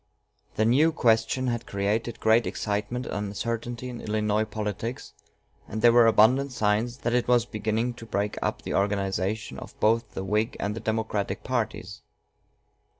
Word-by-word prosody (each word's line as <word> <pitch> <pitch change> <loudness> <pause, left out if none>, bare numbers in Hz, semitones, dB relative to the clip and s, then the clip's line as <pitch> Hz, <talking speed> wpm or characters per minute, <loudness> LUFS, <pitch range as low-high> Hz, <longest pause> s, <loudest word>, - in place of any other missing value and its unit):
The 110 - +2
new 145 +8 +4
question 115 -2 +2
had 120 -2 -2
created 105 +4 -1
great 110 +1 +3
excitement 105 +4 -2
and 105 -2 -3
uncertainty 115 +4 -4
in 120 -2 -7
Illinois 105 0 0
politics, 110 +2 -5 0.5
and 110 +1 -5
there 120 - +8
were 120 -1 +7
abundant 125 +5 +4
signs 110 +2 0
that 120 - +1
it 125 0 +1
was 120 -2 +4
beginning 110 +2 -1
to 115 -1 -11
break 105 -1 -1
up - - -2
the - - -4
organization 100 +1 -1
of - - -12
both 115 0 +2
the 95 - -3
Whig 105 +4 0
and 105 +1 -2
the - - -4
Democratic 110 -2 -2
parties. - - -3
110 Hz, 155 wpm, -26 LUFS, 105-120 Hz, 0.5 s, there